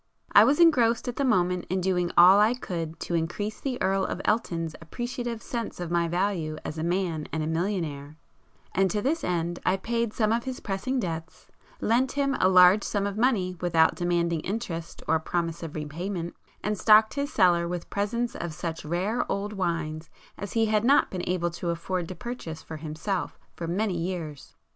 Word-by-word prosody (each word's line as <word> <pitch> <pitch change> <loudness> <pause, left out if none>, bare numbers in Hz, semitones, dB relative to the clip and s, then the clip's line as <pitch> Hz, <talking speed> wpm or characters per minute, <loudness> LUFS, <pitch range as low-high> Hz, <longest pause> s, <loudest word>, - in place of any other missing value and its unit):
I - - +8
was 290 +3 +3
engrossed 245 -10 +4
at 245 - -4
the 280 - +1
moment 180 -8 +1
in 185 +2 0
doing 180 -1 +1
all 185 +3 +8
I 220 +4 +4
could 165 -8 -5
to - - -4
increase 175 +6 -2
the 260 -3 -3
Earl 195 0 +1
of - - -3
Elton's 170 -7 0
appreciative 240 +5 -5
sense 235 -6 -4
of 175 -1 -4
my 170 -1 +2
value 175 -3 -1
as 160 - -5
a - - -2
man 170 -3 -1
and 160 -1 -2
a - - -2
millionaire, 160 -4 -2 0.6
and 190 +1 +3
to 210 +1 -1
this 320 +5 0
end 175 0 -1
I 185 +1 +2
paid 230 +2 -1
some 215 -1 +1
of 230 +1 0
his 260 -1 -4
pressing 240 +7 -2
debts, 165 -4 -5 0.3
lent 245 +4 +2
him 275 -1 +1
a 185 - +4
large 185 +2 +7
sum 200 -1 -1
of 200 -1 -3
money 210 -6 +1
without 165 -2 +4
demanding 170 -2 0
interest 175 -3 -5
or 160 0 +3
promise 165 +1 -2
of 165 -3 -7
repayment, 170 +4 -4 0.3
and 210 -1 -1
stocked 215 0 +6
his 280 +1 -2
cellar 175 - +3
with 175 -1 -5
presents 235 +4 -1
of 170 -2 -4
such 165 -2 -4
rare 185 +9 -1
old 205 +2 -2
wines 165 -4 -2 0.3
as 200 -1 -7
he 225 -1 +3
had 215 -1 +1
not 275 +4 +4
been 180 -2 -4
able 175 -1 0
to 170 +1 -4
afford 170 +1 -2
to 185 - -7
purchase 235 -10 -7
for 160 - -7
himself 160 +5 -3 0.2
for 165 - -6
many 190 +3 0
years. 165 -5 -5
185 Hz, 190 wpm, -27 LUFS, 170-215 Hz, 0.6 s, I